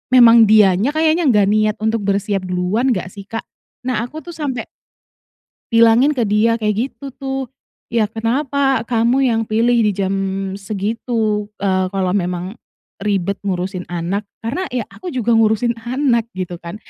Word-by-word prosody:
memang 235 Hz, -2 st, +8 dB
dianya 210 Hz, +4 st, +4 dB
kayaknya 320 Hz, +2 st, +2 dB
gak 210 Hz, -4 st, +4 dB
niat 215 Hz, 0 st, +2 dB
untuk 220 Hz, +1 st, +1 dB
bersiap 200 Hz, 0 st, 0 dB
duluan 180 Hz, +8 st, 0 dB
nggak 185 Hz, -, -3 dB
sih, 200 Hz, -2 st, -11 dB
Kak? 225 Hz, -, -4 dB, 0.4 s
Nah 250 Hz, -4 st, 0 dB
aku 310 Hz, +5 st, -9 dB
tuh 345 Hz, -, -8 dB
sampai 280 Hz, -7 st, -3 dB, 1.1 s
bilangin 230 Hz, +5 st, +5 dB
ke 250 Hz, -6 st, 0 dB
dia 220 Hz, +3 st, +2 dB
kayak 210 Hz, -2 st, 0 dB, 0.2 s
gitu 275 Hz, -2 st, -10 dB
tuh, 270 Hz, 0 st, -4 dB, 0.5 s
"ya 220 Hz, -3 st, +2 dB
kenapa 270 Hz, +4 st, 0 dB
kamu 235 Hz, +3 st, +1 dB
yang 225 Hz, -, +1 dB
pilih 235 Hz, +3 st, +2 dB
dijam 195 Hz, -1 st, 0 dB, 0.4 s
segitu, 210 Hz, +1 st, -2 dB, 0.2 s
eee, 185 Hz, -1 st, +1 dB
kalau 185 Hz, -2 st, 0 dB
memang 180 Hz, +2 st, -2 dB, 0.4 s
ribet 200 Hz, -1 st, -1 dB
ngurusin 185 Hz, -1 st, -3 dB
anak? 175 Hz, +4 st, -3 dB, 0.2 s
Karena 280 Hz, +12 st, -2 dB
ya 245 Hz, -, 0 dB
aku 360 Hz, -5 st, -8 dB
juga 240 Hz, -2 st, 0 dB
ngurusin 225 Hz, +1 st, +2 dB
anak 240 Hz, 0 st, 0 dB
gitu 180 Hz, -2 st, -5 dB
kan 170 Hz, +2 st, -8 dB
220 Hz, 150 wpm, -18 LUFS, 195-245 Hz, 1.1 s, memang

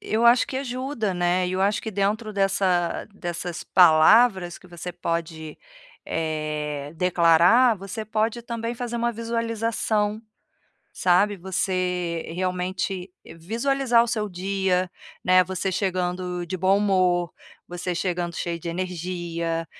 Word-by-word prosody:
Eu 225 Hz, +2 st, +1 dB
acho 240 Hz, +1 st, +5 dB
que 260 Hz, -, -5 dB
ajuda, 255 Hz, -6 st, -3 dB
né, 175 Hz, +1 st, +1 dB
e -, -, -3 dB
eu 185 Hz, -, -1 dB
acho 200 Hz, +1 st, +1 dB
que 220 Hz, -, -4 dB
dentro 210 Hz, +2 st, -1 dB
dessa 190 Hz, -3 st, +1 dB
dessas 175 Hz, -2 st, -5 dB
palavras 180 Hz, +2 st, +5 dB
que -, -, -18 dB
você 175 Hz, 0 st, -7 dB
pode, 165 Hz, -2 st, -4 dB, 0.5 s
eh, 150 Hz, -2 st, -3 dB
declarar, 180 Hz, +7 st, +5 dB
você 195 Hz, +3 st, -6 dB
pode 220 Hz, +2 st, -1 dB
também 235 Hz, 0 st, -4 dB
fazer 240 Hz, 0 st, -4 dB
uma 235 Hz, 0 st, 0 dB
visualização, 230 Hz, -2 st, -1 dB, 0.7 s
sabe. 190 Hz, +3 st, +2 dB
Você 180 Hz, -2 st, -2 dB
realmente 185 Hz, 0 st, -2 dB, 0.3 s
visualizar 235 Hz, +6 st, +2 dB
o -, -, -4 dB
seu 215 Hz, -2 st, -1 dB
dia, 185 Hz, 0 st, -1 dB, 0.3 s
né, 185 Hz, 0 st, +5 dB
você 190 Hz, +1 st, -2 dB
chegando 180 Hz, -1 st, -2 dB
de 185 Hz, +2 st, -4 dB
bom 190 Hz, +2 st, +3 dB
humor, 185 Hz, -4 st, +2 dB, 0.4 s
você 175 Hz, 0 st, -4 dB
chegando 175 Hz, -1 st, -2 dB
cheio 170 Hz, -1 st, -3 dB
de 170 Hz, -, -7 dB
energia, 170 Hz, -2 st, -3 dB
185 Hz, 125 wpm, -24 LUFS, 175-215 Hz, 0.7 s, acho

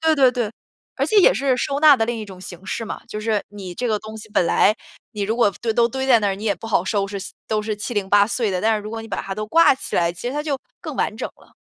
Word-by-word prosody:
对 320 Hz, 0 st, +3 dB
对 270 Hz, -4 st, +5 dB
对， 240 Hz, -4 st, -2 dB, 0.5 s
而 -, -, +1 dB
且 435 Hz, -, +1 dB
也 375 Hz, -, +7 dB
是 260 Hz, +3 st, +1 dB
收 280 Hz, +3 st, -1 dB
纳 300 Hz, -2 st, +8 dB
的 225 Hz, -2 st, 0 dB
另 235 Hz, -1 st, -2 dB
一 215 Hz, -, -5 dB
种 190 Hz, -2 st, -11 dB
形 180 Hz, 0 st, -10 dB
式 230 Hz, -, -3 dB
嘛。 -, -, -6 dB
就 210 Hz, -, -5 dB
是 215 Hz, -1 st, 0 dB
你 190 Hz, -3 st, -8 dB
这 245 Hz, -, -2 dB
个 215 Hz, -2 st, +1 dB
东 215 Hz, +1 st, -9 dB
西 220 Hz, 0 st, -10 dB
本 195 Hz, -, +2 dB
来， 215 Hz, -, +4 dB, 0.4 s
你 210 Hz, -, -4 dB
如 215 Hz, +3 st, -1 dB
果 235 Hz, -4 st, +4 dB
堆 230 Hz, -, 0 dB
都 235 Hz, +1 st, +3 dB
堆 265 Hz, +2 st, -3 dB
在 240 Hz, -4 st, +5 dB
那 205 Hz, -, +1 dB
儿， 195 Hz, -, 0 dB
你 200 Hz, +3 st, -8 dB
也 205 Hz, -2 st, +2 dB
不 -, -, -10 dB
好 205 Hz, -5 st, +1 dB
收 200 Hz, 0 st, 0 dB
拾， 200 Hz, 0 st, -5 dB, 0.3 s
都 215 Hz, -1 st, +1 dB
是 215 Hz, 0 st, -2 dB
七 215 Hz, +4 st, -5 dB
零 200 Hz, -2 st, -1 dB
八 205 Hz, 0 st, +5 dB
碎 225 Hz, -1 st, -1 dB
的。 185 Hz, -1 st, -1 dB
但 220 Hz, +2 st, +3 dB
是 210 Hz, -, -5 dB
如 210 Hz, -, -7 dB
果 225 Hz, 0 st, -5 dB
你 225 Hz, -, -10 dB
把 -, -, -2 dB
它 195 Hz, -, -5 dB
都 215 Hz, +1 st, -4 dB
挂 330 Hz, +4 st, +5 dB
起 -, -, -5 dB
来， 170 Hz, 0 st, +2 dB
其 170 Hz, -, -12 dB
实 -, -, -4 dB
它 295 Hz, +1 st, -2 dB
就 290 Hz, -3 st, -2 dB, 0.2 s
更 -, -, -6 dB
完 -, -, -1 dB
整 -, -, -3 dB
了。 -, -, -22 dB
220 Hz, 340 characters per minute, -21 LUFS, 205-245 Hz, 0.5 s, 纳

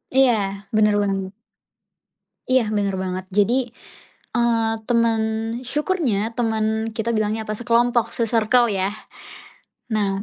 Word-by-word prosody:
Iya 265 Hz, -2 st, +6 dB, 0.4 s
benar 210 Hz, -1 st, +4 dB
banget. 195 Hz, -1 st, -2 dB, 1.2 s
Iya, 255 Hz, -4 st, +3 dB
benar 200 Hz, -2 st, 0 dB
banget. 185 Hz, 0 st, -3 dB
Jadi, 235 Hz, +5 st, +2 dB, 0.6 s
eee, 230 Hz, -2 st, +2 dB
temen 230 Hz, -1 st, +2 dB, 0.4 s
syukurnya 260 Hz, -, -1 dB
temen 220 Hz, -1 st, 0 dB
kita 225 Hz, +1 st, -2 dB
bilangnya, 215 Hz, +1 st, -1 dB
apa, 215 Hz, -, -2 dB
sekelompok, 240 Hz, +1 st, +1 dB
se-circle 230 Hz, +1 st, +2 dB
ya. 195 Hz, -1 st, -1 dB, 1.0 s
Nah, 200 Hz, -3 st, 0 dB
225 Hz, 105 wpm, -22 LUFS, 210-235 Hz, 1.2 s, Iya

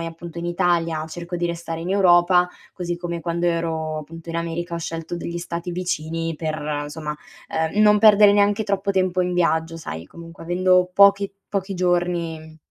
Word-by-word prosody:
ehm, 165 Hz, -, -3 dB
appunto 170 Hz, +1 st, -9 dB
in 170 Hz, -, -5 dB
Italia 170 Hz, -2 st, 0 dB
cerco 175 Hz, +2 st, -7 dB
di 175 Hz, -, -2 dB
restare 170 Hz, -1 st, -5 dB
in 175 Hz, -, -4 dB
Europa, 180 Hz, -2 st, +4 dB, 0.2 s
così 175 Hz, -1 st, -4 dB
come 170 Hz, -1 st, -4 dB
quando 170 Hz, +1 st, -1 dB
ero 160 Hz, -2 st, -1 dB
appunto 165 Hz, +2 st, -10 dB
in 165 Hz, -, -3 dB
America 170 Hz, +1 st, -3 dB
ho -, -, -2 dB
scelto 165 Hz, +1 st, -5 dB
degli 170 Hz, 0 st, -5 dB
stati 170 Hz, 0 st, -5 dB
vicini 165 Hz, -2 st, -3 dB
per, 150 Hz, -2 st, -3 dB
somma, 150 Hz, 0 st, -5 dB, 0.3 s
ehm, 160 Hz, +6 st, -1 dB
non 210 Hz, 0 st, +6 dB
perdere 210 Hz, -1 st, +7 dB
neanche 205 Hz, +1 st, +3 dB
troppo 200 Hz, -1 st, -1 dB
tempo 185 Hz, -1 st, +1 dB
in 180 Hz, 0 st, -2 dB
viaggio, 165 Hz, -1 st, +1 dB
sai 80 Hz, -, -7 dB
comunque 165 Hz, -, -12 dB
avendo 180 Hz, +1 st, +3 dB
pochi 200 Hz, 0 st, +5 dB, 0.2 s
pochi 195 Hz, -1 st, -3 dB
giorni 175 Hz, -3 st, -1 dB
170 Hz, 175 wpm, -22 LUFS, 165-180 Hz, 0.3 s, perdere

